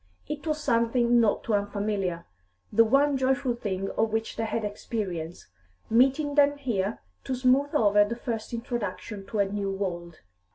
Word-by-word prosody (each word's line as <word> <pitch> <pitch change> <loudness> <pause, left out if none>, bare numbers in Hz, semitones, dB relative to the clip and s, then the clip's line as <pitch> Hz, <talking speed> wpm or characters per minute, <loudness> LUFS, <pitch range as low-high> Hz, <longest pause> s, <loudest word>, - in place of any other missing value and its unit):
It 300 +1 -5
was 305 0 0
something 235 -2 +2
not 225 -3 +2
too 225 - -2
unfamiliar; 200 -3 -1 0.5
the 230 - +6
one 275 +4 +3
joyful 265 -1 +1
thing 195 -4 -3
of 220 0 0
which 225 0 -2
they 225 - -2
had 220 0 -2
experience 190 -5 -4 0.5
meeting 270 +5 +3
them 290 0 +4
here 225 -7 -1 0.3
to 260 - -2
smooth 265 +4 +2
over 205 -5 +5
the 215 +3 -3
first 230 -3 -4
introduction 210 -4 -5
to 220 - -4
a 200 - +3
new 200 0 -3
world. 175 -4 -4
225 Hz, 160 wpm, -27 LUFS, 200-255 Hz, 0.5 s, the